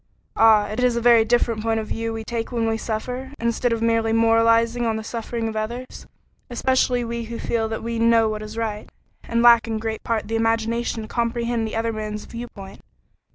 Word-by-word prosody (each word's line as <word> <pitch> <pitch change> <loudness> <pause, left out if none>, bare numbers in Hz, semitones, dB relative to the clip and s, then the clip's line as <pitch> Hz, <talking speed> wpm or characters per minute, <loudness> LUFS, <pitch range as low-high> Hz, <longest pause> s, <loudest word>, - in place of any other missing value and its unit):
Ah! 220 -2 +5
it 215 +3 -4
is 250 -1 +3
a - - +1
very 235 -1 +5
different 230 -1 +1
point 225 0 0
of 220 - -4
view 225 +1 -3
we 225 0 -5
take 230 +1 -4
when 230 -2 0
we 225 - +1
suffer, 250 +4 -4
instead 235 +1 0
of 230 0 -1
merely 230 -1 +2
moralizing 230 +1 +3
on 225 - 0
the 220 - -4
suffering 230 0 -4
of 220 - -5
others; 235 +4 -5 0.4
especially 250 0 +1
we 235 0 -4
who 230 +1 -6
feel 225 -1 -1
that 220 - -4
we 230 0 -3
know 230 -1 +4
what 215 0 -3
is 215 +1 -8
right, 215 -2 -3 0.4
and 235 0 0
lack 235 -1 +6
in 225 -1 -2
great 220 0 -4
part 225 -3 -2
the 225 - -2
imagination 225 0 0
to - - -8
comprehend 235 -1 -1
the 220 - -6
other 225 0 -1
man's 215 -1 -5
viewpoint. 205 -5 -9
230 Hz, 205 wpm, -22 LUFS, 220-235 Hz, 0.4 s, lack